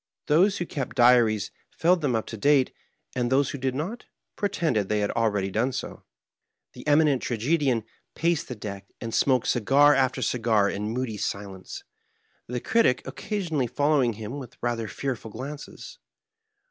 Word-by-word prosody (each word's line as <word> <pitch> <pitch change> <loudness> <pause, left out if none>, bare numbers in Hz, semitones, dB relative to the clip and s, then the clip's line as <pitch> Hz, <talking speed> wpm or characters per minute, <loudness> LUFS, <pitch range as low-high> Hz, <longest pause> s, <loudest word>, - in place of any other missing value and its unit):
Those 185 +7 +4
who 175 - -2
kept 140 -5 -5
diaries 120 -5 +4 0.3
filled 175 +1 +3
them 135 -5 +1
up 110 - -1
to - - -7
date, 135 +3 +3 0.4
and 120 0 0
those 135 0 +3
who 140 - -6
did 130 0 -1
not, 180 - -4 0.3
pretended 155 - 0
they 105 -1 +1
had 100 - 0
already 105 -4 0
done 120 +6 +1
so. 130 - -6 0.7
TheEmi 150 +1 +3
nent 140 -4 +2
Tragedian 130 0 0 0.3
paced 170 -1 0
the 125 - -5
deck, 100 -2 -7
and 115 -1 -5
smoked 130 -3 +2
cigar 140 +5 +4
after 130 -2 +1
cigar 110 -4 +2
in 105 +2 -3
moody 120 -2 -3
silence, 100 -2 -5 0.6
the 125 +1 -3
Critic 220 - +2
occasionally 165 - -2
following 145 -2 +2
him 110 +6 -6
with 125 -3 -10
rather 115 -2 -2
fearful 125 0 -4
glances. 140 +7 -8
125 Hz, 155 wpm, -26 LUFS, 110-145 Hz, 0.7 s, Those